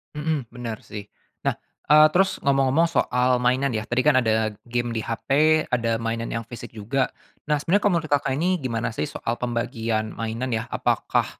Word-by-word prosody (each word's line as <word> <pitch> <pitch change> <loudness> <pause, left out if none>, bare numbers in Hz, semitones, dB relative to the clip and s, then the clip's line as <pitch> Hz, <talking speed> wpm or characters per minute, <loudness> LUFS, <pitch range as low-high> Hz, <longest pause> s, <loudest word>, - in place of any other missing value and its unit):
Mhm. 150 -3 -1
Bener, 115 -3 -5
sih. 105 -1 -8 0.3
Nah, - - -1 0.3
eee, 155 +1 +8
terus, 190 +1 +3
ngomong-ngomong 135 +3 +3
soal 125 -5 +1
mainan, 125 +2 +1
ya, 110 - -1
tadi 120 +4 -1
kan 150 - +6
ada 110 -1 +1
game 120 0 -2
di 110 - -2
HP, 150 +8 +2
ada 115 -2 +1
mainan 115 0 -3
yang 115 -1 -4
fisik 120 0 -9
juga. 115 +5 -1 0.4
Nah, 150 - +3
sebenernya 180 +8 +1
kalau 205 - +3
menurut 155 -2 -4
Kakak 135 -2 +1
ini, 180 +2 +1
gimana 115 -3 -2
sih, 145 - -3
soal 115 - -3
pembagian 115 -2 -2
mainan 115 +2 -3
ya, 110 +1 -2
apakah - - 0
125 Hz, 180 wpm, -24 LUFS, 115-145 Hz, 0.4 s, eee